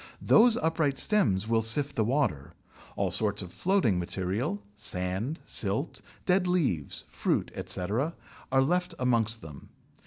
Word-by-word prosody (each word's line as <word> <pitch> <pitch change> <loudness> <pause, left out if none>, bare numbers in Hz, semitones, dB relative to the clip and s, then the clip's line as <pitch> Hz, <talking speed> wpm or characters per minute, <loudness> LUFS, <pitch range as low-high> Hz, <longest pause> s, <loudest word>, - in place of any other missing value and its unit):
Those 235 +1 +6
upright 160 - 0
stems 110 - +3
will 115 0 +2
sift 135 +6 +2
the 110 - +2
water: 110 - -1 0.4
all - - -1
sorts 105 -1 0
of 90 - -10
floating 180 - +1
material, 100 - -3
sand, 100 - -1
silt, - - -3 0.2
dead 180 0 +2
leaves, 140 - -1
fruit, - - -1
etc., 115 - -2 0.4
are 135 0 +4
left 180 +4 0
amongst 115 -3 +1
them. 75 -3 -11
120 Hz, 130 wpm, -28 LUFS, -, 0.4 s, Those